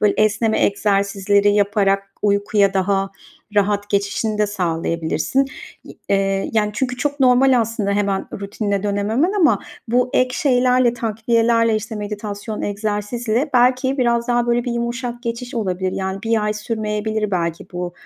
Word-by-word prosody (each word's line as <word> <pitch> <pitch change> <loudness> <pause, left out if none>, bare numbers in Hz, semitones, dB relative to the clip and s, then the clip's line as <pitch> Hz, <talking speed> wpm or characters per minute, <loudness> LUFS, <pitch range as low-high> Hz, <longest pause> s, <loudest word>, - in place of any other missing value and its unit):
böyle 210 -1 +3
esneme 215 +1 +2
egzersizleri 200 0 +1
yaparak 200 -1 +1
uykuya 200 -1 +2
daha 195 0 +1 0.4
rahat 205 0 +1
geçişini 205 +2 -1
de 210 - +3
sağlayabilirsin. 170 - -1 0.4
Y - - -12
eee, 195 0 0
yani 210 -2 +1
çünkü 250 +1 -2
çok 285 +2 -2
normal 255 0 +5
aslında 220 -2 -2
hemen 200 -1 0
rutinine 200 0 -2
dönememen 210 - 0
ama 315 - +3 0.3
bu 250 +2 +2
ek 255 0 +2
şeylerle, 250 -3 +3
takviyelerle, 230 0 +1
işte, 220 +1 -5
meditasyon, 210 +1 -5
egzersizle 215 +5 -2
belki 255 +2 +3
biraz 235 -1 +1
daha 240 0 +2
böyle 240 0 +1
bir 245 - -2
yumuşak 240 +1 -3
geçiş 235 +1 -5
olabilir. 185 -4 -2
Yani, 190 0 -3
1 225 -2 +1
ay 210 - 0
sürmeyebilir 215 0 -2
belki 170 -3 -2
bu, 175 0 -4
215 Hz, 140 wpm, -20 LUFS, 200-240 Hz, 0.4 s, normal